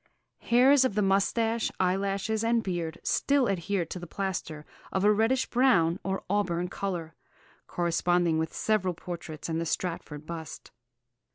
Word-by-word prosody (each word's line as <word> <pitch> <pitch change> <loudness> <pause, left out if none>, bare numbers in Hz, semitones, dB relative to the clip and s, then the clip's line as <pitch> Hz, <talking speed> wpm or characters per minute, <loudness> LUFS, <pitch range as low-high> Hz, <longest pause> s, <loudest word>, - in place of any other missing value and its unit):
Hairs 260 +3 +5
of 255 -6 0
the 210 - +2
moustache, 225 +4 +1
eyelashes, 195 +4 0
and 230 0 +2
beard 170 -3 -3
still 280 -2 +2
adhere 195 -2 -1
to 180 - -7
the 175 - -8
plaster, 165 -5 -4 0.3
of 190 - 0
a 210 - +6
reddish 225 +5 +2
brown 195 -10 +3
or 190 0 -2
auburn 180 -3 0
colour, 175 -5 -4 0.5
corresponding 175 -1 +1
with 160 0 -2
several 190 -5 0
portraits 160 -3 -7
and 165 0 -1
the - - -2
Stratford 155 -4 -3
bust.... 160 -1 -8
190 Hz, 145 wpm, -28 LUFS, 170-215 Hz, 0.5 s, a